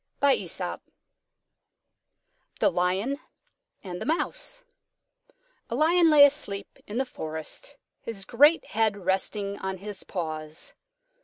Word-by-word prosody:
_ 280 Hz, -1 st, +1 dB, 1.8 s
THE -, -, +4 dB
LION 190 Hz, +10 st, 0 dB, 0.6 s
AND 180 Hz, -2 st, -6 dB
THE -, -, -3 dB
MOUSE -, -, -1 dB, 1.1 s
A 235 Hz, -, -2 dB
Lion 330 Hz, +4 st, +4 dB
lay 295 Hz, -2 st, +9 dB
asleep 205 Hz, -9 st, -1 dB
in 210 Hz, -, -5 dB
the 265 Hz, -, +1 dB
forest, 160 Hz, -, -5 dB, 0.2 s
his 200 Hz, -4 st, -4 dB
great 290 Hz, -, +5 dB
head 215 Hz, -1 st, +1 dB
resting 200 Hz, +2 st, -1 dB
on 190 Hz, 0 st, -3 dB
his 200 Hz, 0 st, -6 dB
paws. 155 Hz, -3 st, -4 dB
210 Hz, 105 wpm, -27 LUFS, 190-285 Hz, 1.8 s, lay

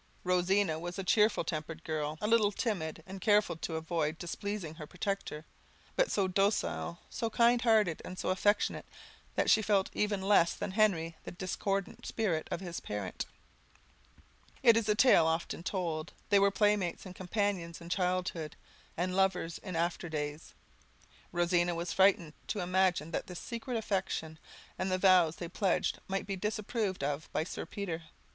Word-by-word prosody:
Rosina 180 Hz, -2 st, +2 dB
was 175 Hz, +2 st, -5 dB
a 195 Hz, -, -2 dB
cheerful 210 Hz, +3 st, +3 dB
tempered 160 Hz, 0 st, -4 dB
girl, 155 Hz, -1 st, -2 dB
a 210 Hz, -, 0 dB
little 215 Hz, -2 st, +4 dB
timid, 170 Hz, -8 st, -2 dB
and 190 Hz, 0 st, -8 dB
careful 210 Hz, -3 st, +3 dB
to 165 Hz, 0 st, -4 dB
avoid 160 Hz, -1 st, -1 dB
displeasing 185 Hz, -1 st, -4 dB
her 155 Hz, -2 st, -9 dB
protector; 180 Hz, -4 st, -3 dB, 0.5 s
but -, -, +2 dB
so 195 Hz, -2 st, +2 dB
docile, 185 Hz, -, 0 dB
so 230 Hz, -2 st, -3 dB
kind 235 Hz, +1 st, +4 dB
hearted, 215 Hz, -8 st, +3 dB
and 185 Hz, -, -7 dB
so -, -, -2 dB
affectionate, 205 Hz, +2 st, +1 dB, 0.5 s
that -, -, +1 dB
she 220 Hz, -, +6 dB
felt 200 Hz, -2 st, +2 dB
even 210 Hz, -1 st, 0 dB
less 190 Hz, -3 st, +4 dB
than -, -, -4 dB
Henry 185 Hz, -6 st, +2 dB
the -, -, -6 dB
discordant 195 Hz, +2 st, -3 dB
spirit 180 Hz, -9 st, -1 dB
of 175 Hz, -, -3 dB
his 175 Hz, -3 st, -5 dB
parent. 100 Hz, -3 st, -4 dB, 1.4 s
It 230 Hz, -, +8 dB
is 225 Hz, -1 st, +1 dB
a 210 Hz, -, +4 dB
tale 210 Hz, -8 st, +6 dB
often 165 Hz, 0 st, -1 dB
told; 170 Hz, -3 st, -3 dB, 0.2 s
they 200 Hz, -1 st, +6 dB
were 200 Hz, 0 st, +5 dB
playmates 205 Hz, -3 st, +1 dB
and 185 Hz, -, -8 dB
companions 185 Hz, -3 st, -2 dB
in 170 Hz, -, -10 dB
childhood, 180 Hz, -3 st, -1 dB, 0.4 s
and 180 Hz, +2 st, -1 dB
lovers 190 Hz, -3 st, +1 dB
in 185 Hz, -, -6 dB
after 170 Hz, +1 st, -1 dB
days. 150 Hz, 0 st, -4 dB, 0.8 s
Rosina 175 Hz, 0 st, +2 dB
was 170 Hz, +1 st, -3 dB
frightened 190 Hz, -5 st, +4 dB
to 205 Hz, -, -2 dB
imagine 180 Hz, -3 st, +1 dB
that -, -, -3 dB
this 180 Hz, -, -7 dB
secret 235 Hz, +1 st, -4 dB
affection, 185 Hz, -7 st, -2 dB, 0.4 s
and 185 Hz, 0 st, -1 dB
the 185 Hz, -, +2 dB
vows 185 Hz, -4 st, +5 dB
they 170 Hz, -, -5 dB
pledged, 185 Hz, +1 st, 0 dB
might 195 Hz, 0 st, -2 dB
be 195 Hz, -, -3 dB
disapproved 210 Hz, -, -2 dB
of 145 Hz, +2 st, -2 dB
by -, -, 0 dB
Sir 165 Hz, -, -6 dB
Peter. 170 Hz, -5 st, -4 dB
185 Hz, 165 wpm, -32 LUFS, 165-205 Hz, 1.4 s, It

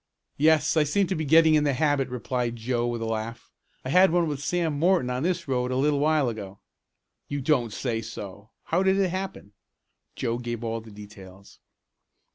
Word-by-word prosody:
"Yes. 155 Hz, +2 st, +3 dB
I 155 Hz, -, +4 dB
seem 195 Hz, +7 st, +1 dB
to 185 Hz, -, -2 dB
be 155 Hz, -1 st, -2 dB
getting 160 Hz, +1 st, +5 dB
the 145 Hz, -1 st, +1 dB
habit," 145 Hz, -1 st, +1 dB
replied 125 Hz, -1 st, -3 dB
Joe 120 Hz, +1 st, -1 dB
with 120 Hz, -1 st, -3 dB
a 115 Hz, 0 st, -1 dB
laugh. 110 Hz, +1 st, -6 dB, 0.3 s
"I -, -, -3 dB
had 185 Hz, +6 st, +6 dB
one 170 Hz, 0 st, +2 dB
with 145 Hz, -2 st, -4 dB
Sam 170 Hz, -2 st, 0 dB
Morton 170 Hz, -6 st, +2 dB
on 125 Hz, +1 st, -2 dB
this 175 Hz, 0 st, -1 dB
road 125 Hz, -2 st, 0 dB
a 130 Hz, -, -2 dB
little 145 Hz, +2 st, +2 dB
while 150 Hz, -2 st, +2 dB
ago." 105 Hz, -4 st, -6 dB, 0.7 s
"You 145 Hz, -, -3 dB
don't 130 Hz, -5 st, +1 dB
say 115 Hz, +1 st, -2 dB
so! 105 Hz, -2 st, -9 dB
How 170 Hz, +3 st, 0 dB
did 190 Hz, 0 st, +3 dB
it 195 Hz, -2 st, +2 dB
happen?" 185 Hz, -, -6 dB, 0.6 s
Joe 115 Hz, +1 st, -2 dB
gave 120 Hz, -1 st, -5 dB
all 115 Hz, 0 st, -3 dB
the 110 Hz, -, -14 dB
details. 100 Hz, -2 st, -13 dB
130 Hz, 190 wpm, -26 LUFS, 115-160 Hz, 0.7 s, had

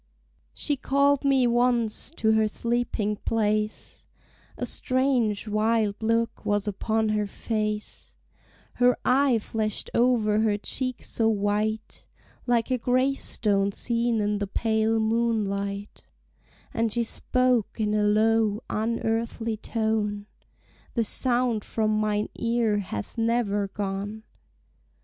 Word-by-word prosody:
She 290 Hz, -2 st, 0 dB
called 280 Hz, +2 st, +2 dB
me 270 Hz, -2 st, +3 dB
once 240 Hz, -2 st, +1 dB
to 220 Hz, -1 st, +2 dB
her 220 Hz, 0 st, +3 dB
sleeping 230 Hz, -2 st, -1 dB
place, 215 Hz, -1 st, -2 dB, 0.5 s
A -, -, -2 dB
strange, 255 Hz, -5 st, +1 dB
wild 215 Hz, 0 st, +1 dB
look 230 Hz, +1 st, 0 dB
was 205 Hz, 0 st, 0 dB
upon 220 Hz, +2 st, 0 dB
her 210 Hz, -1 st, 0 dB
face, 215 Hz, 0 st, -4 dB, 0.6 s
Her 245 Hz, 0 st, +4 dB
eye 265 Hz, -1 st, +4 dB
flashed 215 Hz, -1 st, -3 dB
over 230 Hz, -3 st, +3 dB
her 215 Hz, -2 st, +2 dB
cheek 255 Hz, +4 st, -3 dB
so 225 Hz, -1 st, 0 dB
white, 215 Hz, +1 st, -1 dB, 0.4 s
Like 240 Hz, +1 st, +1 dB
a 255 Hz, -, +1 dB
gravestone 235 Hz, -6 st, +1 dB
seen 235 Hz, 0 st, 0 dB
in 205 Hz, 0 st, 0 dB
the 200 Hz, -, -2 dB
pale 220 Hz, +1 st, +1 dB
moonlight, 210 Hz, -3 st, -1 dB, 0.7 s
And 225 Hz, -1 st, 0 dB
she 235 Hz, +2 st, +1 dB
spoke 250 Hz, -1 st, 0 dB
in 210 Hz, -1 st, 0 dB
a 210 Hz, -, +2 dB
low, 215 Hz, +1 st, +2 dB
unearthly 225 Hz, 0 st, -1 dB
tone, 215 Hz, -2 st, -1 dB, 0.7 s
The 230 Hz, -, +2 dB
sound 240 Hz, -1 st, +1 dB
from 215 Hz, -1 st, -1 dB
mine 210 Hz, 0 st, 0 dB
ear 230 Hz, -3 st, +1 dB
hath 145 Hz, -, -6 dB
never 225 Hz, -3 st, +1 dB
gone! 200 Hz, +2 st, -4 dB
220 Hz, 115 wpm, -26 LUFS, 210-235 Hz, 0.7 s, Her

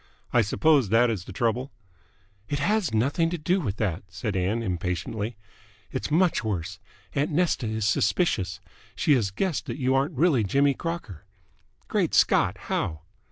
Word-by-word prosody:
I 120 Hz, -, +5 dB
suppose 135 Hz, +2 st, +3 dB
that 115 Hz, +2 st, +4 dB
is 95 Hz, -5 st, -4 dB
the -, -, -9 dB
trouble?" 125 Hz, +1 st, -1 dB, 0.8 s
"It 145 Hz, -, -1 dB
has 205 Hz, +5 st, +1 dB
nothing 140 Hz, +9 st, +1 dB
do 175 Hz, +3 st, 0 dB
with 105 Hz, -, -2 dB
that," 95 Hz, -5 st, -1 dB
said 90 Hz, +3 st, -4 dB
Ann 100 Hz, +6 st, 0 dB
impatiently. 95 Hz, +4 st, -3 dB, 0.5 s
"It's -, -, -3 dB
much 170 Hz, 0 st, +2 dB
worse. 90 Hz, -4 st, -3 dB, 0.3 s
Aunt 145 Hz, +1 st, 0 dB
Nesta 160 Hz, -6 st, +1 dB
is 110 Hz, -1 st, -2 dB
suspicious. 105 Hz, -, +1 dB, 0.4 s
She 155 Hz, -3 st, +3 dB
has 115 Hz, -7 st, +2 dB
guessed 170 Hz, -, -2 dB
that -, -, -4 dB
you 130 Hz, -2 st, +1 dB
aren't 135 Hz, +3 st, 0 dB
really 145 Hz, -6 st, +3 dB
Jimmy 140 Hz, +8 st, +3 dB
Crocker." 130 Hz, -, -6 dB, 0.6 s
"Great -, -, 0 dB
Scott! -, -, +3 dB
How?" 80 Hz, -4 st, -2 dB
120 Hz, 155 wpm, -26 LUFS, 100-150 Hz, 0.8 s, I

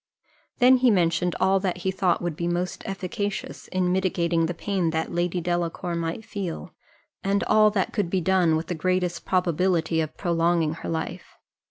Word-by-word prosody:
Then 255 Hz, 0 st, +6 dB
he 250 Hz, 0 st, +4 dB
mentioned 175 Hz, -3 st, +2 dB
all 190 Hz, +1 st, +3 dB
that 185 Hz, -2 st, -2 dB
he 190 Hz, -, +2 dB
thought 180 Hz, -2 st, +1 dB
would 175 Hz, -3 st, -2 dB
be 170 Hz, +2 st, -2 dB
most 175 Hz, +1 st, -2 dB
efficacious 200 Hz, +2 st, -4 dB
in 185 Hz, -1 st, 0 dB
mitigating 170 Hz, -3 st, +1 dB
the 175 Hz, -, -3 dB
pain 190 Hz, -2 st, -1 dB
that 160 Hz, 0 st, -2 dB
Lady 175 Hz, +1 st, 0 dB
Delacour 175 Hz, 0 st, -2 dB
might 170 Hz, +6 st, -3 dB
feel, 190 Hz, -5 st, -5 dB, 0.5 s
and 200 Hz, +1 st, +1 dB
all 215 Hz, 0 st, +5 dB
that 200 Hz, -3 st, -1 dB
could 205 Hz, -6 st, 0 dB
be 190 Hz, -, +1 dB
done, 180 Hz, -2 st, +3 dB
with 160 Hz, +1 st, -2 dB
the 180 Hz, -, -3 dB
greatest 180 Hz, +1 st, -1 dB
probability 175 Hz, -2 st, +1 dB
of 155 Hz, -, -5 dB
prolonging 170 Hz, -2 st, +1 dB
her 165 Hz, -, -7 dB
life. 160 Hz, -1 st, -5 dB
180 Hz, 175 wpm, -25 LUFS, 170-190 Hz, 0.5 s, Then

